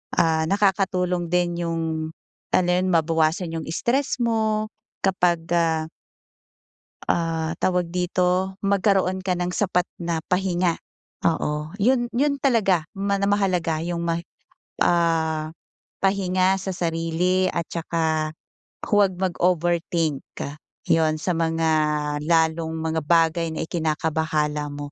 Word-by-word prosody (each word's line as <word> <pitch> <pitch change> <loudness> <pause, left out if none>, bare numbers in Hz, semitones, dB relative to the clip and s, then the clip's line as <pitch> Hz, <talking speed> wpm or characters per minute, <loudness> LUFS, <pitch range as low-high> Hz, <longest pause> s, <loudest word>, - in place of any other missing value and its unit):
Ah, 160 -1 +3
nakakatulong 185 -3 +1
din 175 -1 +1
yung 165 0 -1 0.7
ano 180 - +3
yun, 180 +1 +2
mabawasan 165 +1 +1
yung 160 - -3
stress 255 +9 0
mo 220 -2 +1 0.4
kapag, 175 -3 +1
ah 160 -1 +1 1.2
Ah, 165 -1 0
tawag 180 -1 +2
dito, 180 +1 0
magkaroon 195 -2 +2
ka 185 -1 -1
ng 180 0 -2
sapat 180 -3 +1 0.2
na 170 -1 -1
pahinga. 180 -2 +1 0.5
Oo, 150 -1 0
'yon 240 +3 +2
'yon 280 +3 0
talaga. 210 - +3
Mana 200 0 0
mahalaga 180 -5 +1
'yong 170 +1 -3
ma 165 0 0 0.7
ah, 160 -2 +1 0.6
pahinga 190 -1 +2
sa 190 -1 -4
sarili 170 +2 0
at 170 - -1
tsaka 160 -2 -1 0.6
huwag 200 -3 +3
mag-overthink. 175 -4 0 0.6
'Yon 160 -1 +3
sa 180 - -1
mga 165 0 +1 0.5
lalong 160 0 +1
mga 160 0 -1
bagay 165 0 +3
na 160 - -3
ikinakabahala 155 -2 -1
mo. 145 0 -7
175 Hz, 110 wpm, -23 LUFS, 160-190 Hz, 1.2 s, Ah